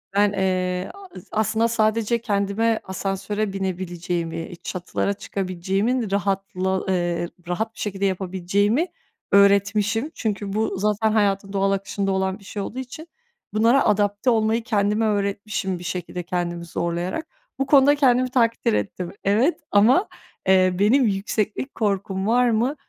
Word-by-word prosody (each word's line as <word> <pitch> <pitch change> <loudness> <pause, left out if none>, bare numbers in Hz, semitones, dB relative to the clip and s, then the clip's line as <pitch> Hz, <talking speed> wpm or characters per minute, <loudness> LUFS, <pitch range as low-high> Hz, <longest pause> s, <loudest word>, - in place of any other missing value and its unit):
ben, 205 0 +4
eee, 185 -1 -1
a 395 -1 -12 0.2
aslında 220 +1 +1
sadece 225 0 +1
kendime 210 +1 0
asansöre 195 +2 -3
binebileceğimi, 175 -3 -3
çatılara 185 +2 -2
çıkabileceğimin 195 +4 -2
rahatla 190 -1 -1
eee, 175 -2 0 0.2
rahat 220 +5 -2
bir - - -16
şekilde 200 -1 -2
yapabileceğimi 195 - 0 0.4
öğretmişim. 200 +6 +3
Çünkü 205 -3 -3
bu 220 -1 -1
zaten 210 +1 +1
hayatın 200 -2 +1
doğal 195 0 +2
akışında 195 0 -1
olan 190 +1 -1
bir 200 - -18
şey 200 +1 -5
olduğu 245 +6 -5
için 285 +6 -8 0.5
bunlara 230 +5 +4
adapte 205 +3 +2
olmayı 225 0 +2
kendime 210 -1 +1
öğretmişim 200 -2 -1
bir - - -9
şekilde, 180 -1 -4
kendimi 175 -1 -3
zorlayarak. 170 - -3 0.3
Bu 270 - +1
konuda 280 +1 +6
kendimi 255 -2 +3
takdir 230 -2 +2
ettim. 180 -3 -2
Evet 225 - +2
ama, 240 - +5 0.4
eee, 185 -1 +4
benim 245 +7 +4
yükseklik 210 +5 -2
korkum 195 -2 -1
var 245 +2 +4
mı 235 +6 +1
200 Hz, 130 wpm, -23 LUFS, 190-225 Hz, 0.5 s, konuda